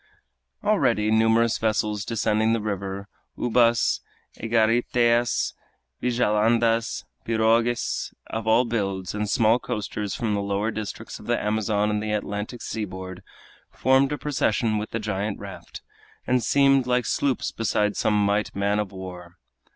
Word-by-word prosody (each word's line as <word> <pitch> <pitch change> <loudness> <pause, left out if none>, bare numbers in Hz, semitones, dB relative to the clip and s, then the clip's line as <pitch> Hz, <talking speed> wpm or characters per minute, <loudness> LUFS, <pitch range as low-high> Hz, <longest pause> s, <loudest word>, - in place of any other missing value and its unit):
Already 105 +1 +2
numerous 115 +1 +3
vessels 105 -1 0
descending 110 0 +1
the 115 - +1
river, 100 -1 -4 0.3
ubas, 120 -1 +3 0.4
egariteas, 120 +1 +2 0.5
vigilandas, 115 -1 +1 0.2
pirogues 115 +1 +1
of 110 0 -5
all 115 +3 +4
builds, 100 -5 -2
and 105 0 -2
small 115 +3 +3
coasters 105 -2 -4
from 110 -3 -1
the 100 - 0
lower 100 +2 -1
districts 110 -3 -6
of - - -13
the - - +1
Amazon 105 0 0
and 105 0 -1
the 105 0 -2
Atlantic 105 +3 -4
seaboard, 95 -4 -5 0.5
formed 135 +1 +2
a 150 - -1
procession 115 -7 0
with 105 - -5
the - - -3
giant 105 -1 -2
raft, 100 -2 -10 0.4
and 125 0 +2
seemed 135 0 +3
like 125 -1 +1
sloops 135 +2 0
beside 105 -2 0
some 105 -1 +2
might 100 +1 0
man 100 +1 +1
of 105 -2 -3
war. 90 -2 -9
110 Hz, 135 wpm, -24 LUFS, 105-115 Hz, 0.5 s, all